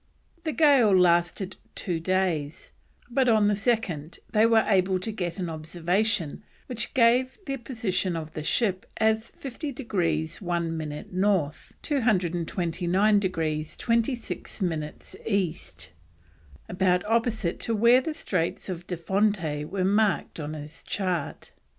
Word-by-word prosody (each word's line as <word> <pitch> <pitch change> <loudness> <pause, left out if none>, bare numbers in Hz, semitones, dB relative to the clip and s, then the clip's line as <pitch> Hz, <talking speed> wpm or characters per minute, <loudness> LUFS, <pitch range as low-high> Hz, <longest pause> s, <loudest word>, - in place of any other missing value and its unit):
The 315 - 0
gale 265 - +5
lasted 175 +2 +2 0.2
two 175 -4 -2
days, 165 -4 -1 0.4
but 255 0 +3
on 215 -2 +4
the 205 - +2
second 200 - -1
they 220 +1 +5
were 225 -1 +5
able 190 -2 +3
to 185 +5 -3
get 180 -4 -3
an 180 -2 -2
observation 170 +3 -1 0.2
which 235 -3 -3
gave 255 +2 +4
the 275 -1 -2
position 215 -8 -1
of 155 -1 -5
the 155 - -4
ship 190 +4 0
as 220 +1 +2
50 280 +2 -6
degrees 170 - -1
1 170 -3 -1
minute 155 +1 -6
North, 185 -6 0
229 185 - +1
degrees 160 -5 -2
26 235 +1 -1
minutes 155 -4 -4
East, 170 - -2 0.8
about 180 0 +1
opposite 225 -5 0
to 230 - -1
where 235 +4 +6
the 310 +3 -4
Straits 180 - -2
of 180 -1 -5
de 180 - -3
Fonte 175 -5 0
were 185 +3 -2
marked 205 -3 +1
on 150 0 -4
his 150 +1 -9
chart. 180 -6 -3
185 Hz, 130 wpm, -26 LUFS, 165-220 Hz, 0.8 s, where